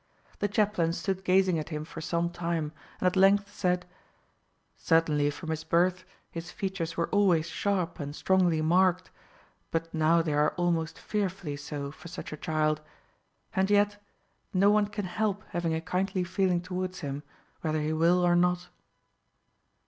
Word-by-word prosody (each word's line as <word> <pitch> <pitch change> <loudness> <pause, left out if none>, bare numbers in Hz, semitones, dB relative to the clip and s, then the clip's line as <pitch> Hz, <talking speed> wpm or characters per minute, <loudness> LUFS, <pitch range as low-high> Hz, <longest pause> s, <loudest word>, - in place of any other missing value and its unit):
The 205 - +1
chaplain 200 -5 +1
stood 190 +1 -2
gazing 185 -2 +3
at 155 - -5
him 155 -1 -4
for 160 0 -8
some 170 +1 -1
time, 165 -3 -2 0.3
and - - -2
at 180 - +3
length 200 +2 +4
said: 180 -2 0 0.9
"Certainly 155 -3 +2
from 160 +2 -5
his 160 0 -3
birth 180 +3 +2 0.3
his 170 +1 -6
features 180 -4 -4
were 170 - +1
always 185 -6 +3
sharp 180 0 -1
and 145 0 -5
strongly 175 -4 +2
marked, 185 +2 +3 0.6
but 165 0 -2
now 165 +1 +3
they 155 -2 -1
are 150 +1 +2
almost 165 -2 0
fearfully 185 -7 -3
so 145 -1 -5
for 165 - -12
such 170 -2 -7
a - - -6
child; 155 0 0 0.7
and 190 +1 +2
yet 205 0 +3 0.5
no 200 +2 +5
one 210 -1 +3
can 210 -1 -4
help 205 +2 -1
having 170 -2 -1
a 160 - -2
kindly 185 +2 -1
feeling 185 -1 +1
towards 185 0 -4
him, 140 -1 -4 0.4
whether 155 -1 0
he 155 +1 -1
will 170 +3 +3
or 175 0 +4
not." 180 0 +2
175 Hz, 160 wpm, -29 LUFS, 160-190 Hz, 0.9 s, no